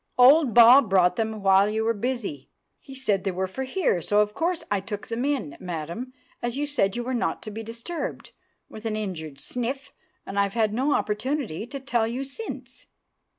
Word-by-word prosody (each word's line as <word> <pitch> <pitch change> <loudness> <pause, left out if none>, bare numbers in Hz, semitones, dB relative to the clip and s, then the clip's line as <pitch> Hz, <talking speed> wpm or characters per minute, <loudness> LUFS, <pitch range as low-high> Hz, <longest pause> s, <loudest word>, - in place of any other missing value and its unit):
"Old 260 0 +6
Bob 240 0 +8
brought 180 -2 +4
them 220 -1 -2
while 195 +1 +5
you 220 +1 -1
were 230 +1 +2
busy. 220 - -4 0.3
He 270 - -12
said 210 -8 0
they 195 - 0
were 190 0 -1
for 265 +8 -5
here, 260 - 0
so 205 +6 +2
of 210 0 0
course 335 +4 -1
I 205 - +2
took 205 +1 -6
them 230 +2 -2
in, 275 - -1
madam, 175 +8 -5 0.3
as 240 +2 -2
you 295 - 0
said 240 -10 0
you 240 - -2
were 255 +2 -3
not 240 - -1
to 215 - -7
be 220 +2 -6
disturbed," 230 +10 -6 0.4
with 220 +1 -7
an 215 - -1
injured 165 -9 -5
sniff, 265 +3 -4 0.3
"and 200 - -3
I've 200 +1 +1
had 220 -2 +2
no 265 +6 +1
opportunity 225 - -2
to 275 +2 -6
tell 240 -4 0
you 245 +4 -3
since." 275 +12 -8
225 Hz, 195 wpm, -25 LUFS, 200-260 Hz, 0.4 s, Bob